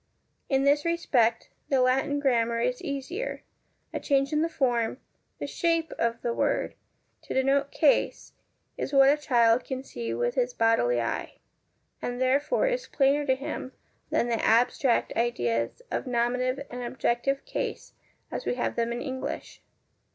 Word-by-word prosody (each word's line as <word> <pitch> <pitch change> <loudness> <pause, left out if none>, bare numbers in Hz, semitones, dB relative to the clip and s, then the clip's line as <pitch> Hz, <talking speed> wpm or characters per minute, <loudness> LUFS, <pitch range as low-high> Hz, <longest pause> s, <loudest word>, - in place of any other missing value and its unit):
In 270 -1 +2
this 290 +1 +3
respect 250 -9 +1 0.2
the 270 - +3
Latin 270 +3 +2
grammar 235 -4 +1
is 250 +1 -1
easier; 325 - -4 0.5
a - - -2
change 275 0 +1
in 300 - +2
the 330 - +1
form, 245 -7 0 0.4
the - - -4
shape 330 -2 0
of 230 0 -1
the 235 - 0
word, - - 0 0.5
to - - -6
denote 275 +2 +2
case, 295 -1 +1 0.5
is 285 - -3
what 275 0 +7
a - - +4
child 240 -5 +3
can 260 -1 -5
see 115 - -5
with 120 +1 0
his 245 0 0
bodily 225 - +3
eye, 115 0 -3 0.6
and 245 0 -3
therefore 280 - +2
is - - -1
plainer 285 +1 +2
to 260 - +4
him 270 -1 -6 0.4
than 235 - +1
the 230 -2 -1
abstract 240 +2 +3
ideas 120 - -1
of - - -2
nominative 250 +3 0
and 245 0 -5
objective 245 +2 -1
case - - -4 0.4
as - - -4
we - - -1
have 245 - -2
them 235 0 0
in 240 - -3
English. 260 -2 -5
255 Hz, 155 wpm, -27 LUFS, 235-280 Hz, 0.6 s, what